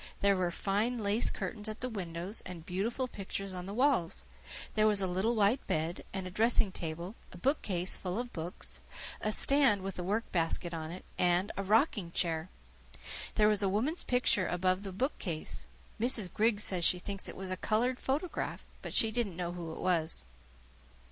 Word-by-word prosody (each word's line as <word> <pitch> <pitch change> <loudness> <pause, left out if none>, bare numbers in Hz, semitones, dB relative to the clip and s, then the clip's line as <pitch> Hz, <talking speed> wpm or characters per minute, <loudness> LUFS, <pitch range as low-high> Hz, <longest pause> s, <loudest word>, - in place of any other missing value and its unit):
There 200 0 +5
were 180 -2 +1
fine 210 +7 0
lace 215 +1 +4
curtains 215 -1 -4
at 215 - -7
the 255 - -1
windows 185 -2 -3
and 170 -3 -8
beautiful 225 +9 -1
pictures 195 -3 -5
on 180 0 -6
the 200 - -5
walls. 250 - +2 0.5
There 215 -1 +4
was 210 -2 +4
a 195 - +2
little 190 +6 +1
white 215 +4 +2
bed, 160 +2 -1
and 190 -1 -4
a 185 - -6
dressing 220 0 +3
table, 170 +3 -5 0.2
a - - -10
bookcase 185 - +1
full 180 +1 -3
of 245 0 -4
books, 170 +3 -4 0.4
a 215 - 0
stand 265 -5 +4
with 195 -1 -4
a - - -2
work 210 +5 -1
basket 170 0 +1
on 160 -1 -4
it, 180 +3 -8
and 180 +3 +3
a - - -2
rocking 210 - +2
chair. 165 -1 0 0.9
There 210 -1 +5
was 210 -1 +4
a 195 - +2
woman's 255 - 0
picture 245 -6 +2
above 185 +1 +1
the 200 -1 -6
bookcase. 185 - -3 0.3
Mrs. 225 -6 +1
Griggs 215 -1 +2
says 180 -3 +3
she 180 - +5
thinks 195 +2 -4
it - - -8
was 190 0 -5
a - - 0
coloured 235 +6 +1
photograph, 300 +7 -2 0.2
but - - -5
she 225 - +5
didn't 215 -7 -1
know 175 -1 -2
who 175 -2 -6
it - - -7
was. 160 - +3
195 Hz, 190 wpm, -32 LUFS, 180-225 Hz, 0.9 s, There